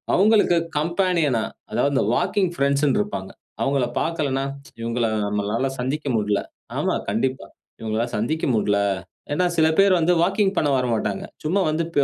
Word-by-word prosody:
அவங்களுக்கு 205 -3 +4 0.2
கம்பேனியன்னா 165 - +1 0.3
அதாவது 125 +6 +1
இந்த 130 - +2
வாக்கிங் 190 +1 +1
பிரெண்ட்ஸ்ன் 140 0 +2
இருப்பாங்க. 95 -2 -3 0.3
அவங்கள 135 -2 +1 0.2
பார்க்கலன்னா, 140 -5 -1 0.4
இவங்கள 115 0 0 0.2
நம்மளால 105 +5 -1
சந்திக்க 145 +4 -2
முடுல. 105 -1 +1 0.4
ஆமா, - - +1 0.2
கண்டிப்பா. 130 +6 -1 0.3
இவங்களால 110 +1 -1
சந்திக்க 140 +10 -1
முடுல. 105 -1 +2 0.5
ஏனா, 180 +5 +2
சில 160 -1 +5
பேர் 195 -3 +5
வந்து 170 +2 +3
வாக்கிங் 195 +2 +1
பண்ண 150 - +2
வரமாட்டாங்க. 115 -5 -1 0.2
சும்மா 180 +6 +1
வந்துட்டு 165 +2 -3
140 Hz, 135 wpm, -23 LUFS, 115-170 Hz, 0.5 s, சில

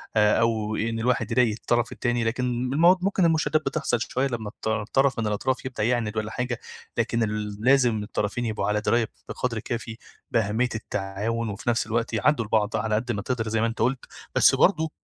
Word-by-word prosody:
آآ 105 -1 +4
أو 110 -2 +1
إن 115 +1 -1
الواحد 115 -2 0
يضايق 115 -3 +3
الطرَف 120 0 +1
التاني. 120 -1 -1
لكن 120 +3 -1 0.3
المو 170 +5 +6
ممكن 195 -1 +2
المشادّات 155 -2 +2
بتحصَل 140 -2 0
شويّة 130 +3 0
لمّا 115 -5 -4
الط 110 - -5 0.2
طرَف 135 -2 +3
من 110 - 0
الأطراف 125 +6 -1
يبدأ 125 -5 -3
يعاند 115 -2 0
والّا 110 0 -2
حاجة، 125 -2 -3 0.4
لكن 115 0 +1
ال 105 -1 -3
لازم 125 -5 +4
الطرفين 105 +3 -2
يبقوا 110 -2 -2
على 105 0 +1
دراية 115 0 +2 0.2
بقدْر 115 -3 -2
كافي 115 0 -5 0.3
بأهمية 115 +2 +1
التعاون، 110 +2 -3
وفي 105 +4 -3
نَفْس 115 -1 +1
الوقت 115 +1 -1
يعدّوا 115 +2 +2
لبعض 105 -1 +1
على 110 -1 0
قد 120 +3 -1
ما 100 -2 -2
تقدَر، 115 -1 -2
زي 110 0 0
ما 115 - +2
أنت 115 - -5
قُلت، 125 +2 0 0.3
بس - - +6
برضه 160 -5 +3
115 Hz, 190 wpm, -25 LUFS, 110-125 Hz, 0.4 s, المو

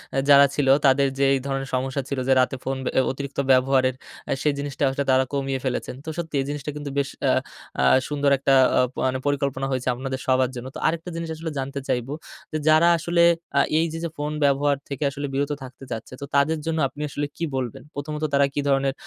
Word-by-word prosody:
আ, - - 0
যারা 140 0 +9
ছিল, 145 -2 +1 0.2
তাদেরও 135 0 +4
যে - - +3
এই 135 - +2
ধরনের 135 0 -3
সমস্যা 130 +2 -1
ছিল, 140 - -2
যে 135 - +5
রাতে 130 +1 +2
ফোন 135 0 -2 0.2
আ - - +5
অতিরিক্ত 140 +1 -6
ব্যবহারের, 130 0 +3 0.3
আ - - -1
সেই 150 - +2
জিনিসটা 140 -1 -3
আসলে 135 +1 -1
তারা 130 0 +4
কমিয়ে 135 -1 -1
ফেলেছেন। 125 -1 -2
তো - - -4
সত্যি, 165 -3 -4
এই - - -3
জিনিসটা 145 0 -4
কিন্তু 145 -1 -5
বেশ 140 -1 +1 0.2
আ - - +5 0.5
আ - - +2 0.2
সুন্দর 145 -1 +1
একটা 135 0 +2 0.2
আ - - +5 0.3
মানে 130 0 +1
পরিকল্পনা 140 -1 -1
হইছে 130 -1 -2
আপনাদের 130 +1 -4
সবার 130 -1 +3
জন্য। 120 +1 -6
তো - - -5
আরেকটা 165 +2 -2
জিনিস 165 -1 -4
আসলে 160 0 -5
জানতে 135 +1 -4
চাইবো 130 +1 -1 0.4
যে 155 - -1
যারা 155 +2 +6
আসলে 170 +1 +1 0.4
আ - - +6 0.2
এই 165 - +2
যে, - - -4 0.2
"ফোন 150 +1 -2
ব্যবহার 140 0 +3
থেকে 140 +1 -3 0.3
বিরত 145 +1 0
থাকতে 130 +1 -11
চাচ্ছে। 115 +2 -6
তো - - -3
তাদের 145 +3 +3
জন্য 160 0 -1
আপনি 145 - -10
আসলে 145 +1 -2
কি - - -4
বলবেন?" 125 -4 -4
প্রথমত 150 +2 -5
তারা 140 0 +5
কি - - -2
ধরনের 135 0 +2
140 Hz, 215 wpm, -24 LUFS, 130-145 Hz, 0.5 s, যারা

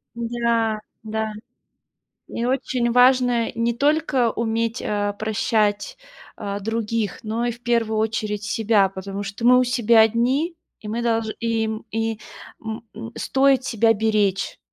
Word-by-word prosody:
Да 235 -2 0 0.3
да. 220 0 -3 1.0
И 235 - -2
очень 250 -2 0
важно 245 -1 +4
не 230 +1 0
только 285 -3 +2
уметь, 230 +1 -1
э, 205 -1 -1
прощать, 215 -1 0 0.4
э, 200 -1 -4
других, 225 0 -2
но 225 +2 -2
и 240 - 0
в 235 - -12
первую 230 -3 +1
очередь 215 -1 -1
себя. 220 -3 +2
Потому 195 +1 -6
что 200 +4 -5
мы 250 +1 +7
у - - +4
себя 235 -2 +4
одни, 255 +9 +1 0.2
и 210 - -10
мы 230 +3 -2
долж 230 -1 0
и 230 -1 0
м 220 +1 -5
и 225 0 -2 0.4
м 220 0 -5
м 230 +2 -8
стоит 270 -1 +2
себя 225 0 +3
беречь. 210 -3 0
225 Hz, 145 wpm, -22 LUFS, 215-240 Hz, 1.0 s, мы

